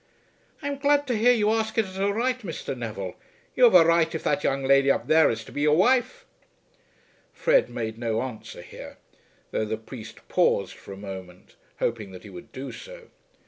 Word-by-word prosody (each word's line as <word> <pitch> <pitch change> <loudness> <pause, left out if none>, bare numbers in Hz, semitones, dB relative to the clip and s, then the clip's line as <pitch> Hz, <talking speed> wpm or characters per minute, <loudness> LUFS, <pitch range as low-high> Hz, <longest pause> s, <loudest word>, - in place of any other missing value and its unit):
"I - - -2
am 285 -1 -3
glad 290 0 +3
to 250 - -1
hear 230 +3 +4
you 215 -3 +2
ask 220 0 -1
it 225 - +3
as 190 0 -9
a 200 +1 +1
right, 250 +4 0
Mr. 165 - -5
Neville. 105 -6 -5 0.4
You 255 - +6
have 225 -6 +5
a 170 -2 +8
right 165 0 +3
if 160 - -4
that 145 - 0
young 135 0 0
lady 135 +1 +4
up - - +1
there 160 0 +5
is 110 -1 -3
to - - -12
be 145 - -4
your 150 +1 +4
wife." 260 - +2 1.1
Fred - - +2
made 110 -1 -5
no 115 -1 -1
answer 125 -4 -8
here, - - -11 0.5
though 110 - -1
the 110 +1 -3
priest 110 +1 -11
paused - - +1
for - - -13
a 95 - -8
moment, 95 -2 -10 0.2
hoping 110 -4 -3
that 90 - -11
he 105 - -11
would 90 -2 -11
do 135 +1 -7
so. - - -11
155 Hz, 205 wpm, -25 LUFS, -, 1.1 s, a